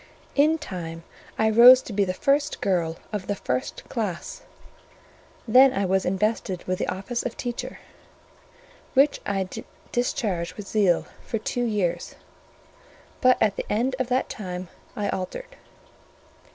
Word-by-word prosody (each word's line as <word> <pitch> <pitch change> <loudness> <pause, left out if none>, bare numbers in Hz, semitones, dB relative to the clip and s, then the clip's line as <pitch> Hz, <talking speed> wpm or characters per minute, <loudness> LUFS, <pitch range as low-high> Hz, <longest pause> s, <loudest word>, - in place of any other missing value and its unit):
In 305 +3 +4
time 165 - -7 0.3
I 220 - +3
rose 245 +3 +9
to 225 - -8
be 200 0 +2
the 185 - -2
first 285 +5 +1
girl 170 -4 0 0.2
of 205 -3 -3
the 205 - -1
first 125 -9 -3
class; 205 -7 -4 1.1
then 255 +4 +7
I 195 0 0
was 190 +1 +1
invested 190 -1 -1
with 185 0 -2
the - - -1
office 195 +6 -3
of 245 - -5
teacher; 240 -1 -4 1.2
which 280 +2 +4
I 195 -2 -1 0.4
discharged 200 -8 -1
with 205 -2 -8
zeal 195 -6 +2 0.2
for 225 - -2
two 245 +3 -2
years: 205 -6 -1 1.1
but 255 0 +5
at 210 -2 +2
the - - -4
end 245 +5 +1
of 255 - 0
that 255 +1 +1
time 180 -3 -6 0.3
I 205 -1 -2
altered. - - -5
210 Hz, 140 wpm, -25 LUFS, 185-245 Hz, 1.2 s, rose